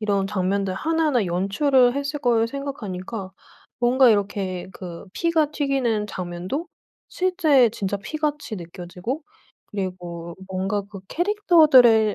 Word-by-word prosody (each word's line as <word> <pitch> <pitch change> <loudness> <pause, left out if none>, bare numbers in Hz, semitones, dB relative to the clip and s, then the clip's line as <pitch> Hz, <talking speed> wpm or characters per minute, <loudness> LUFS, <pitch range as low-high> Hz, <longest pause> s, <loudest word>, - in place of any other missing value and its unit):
이런 200 -2 0
장면들 195 -1 -1
하나하나 305 -2 +1
연출을 245 - +2
했을 280 +1 -2
걸 230 -2 +3
생각하니까 225 -8 -5 0.5
뭔가 250 +2 +5
이렇게 195 -3 -1
그 175 -3 -8
피가 320 +1 +1
튀기는 265 -8 0
장면도 185 - -4 0.4
실제 320 -9 +3
진짜 200 -3 -3
피같이 295 -1 -3
느껴지고 180 - -6 0.4
그리고 175 -3 -5
뭔가 190 +2 -1
그 195 -3 -9
캐릭터들의 305 - +5
220 Hz, 275 characters per minute, -23 LUFS, 190-280 Hz, 0.5 s, 뭔가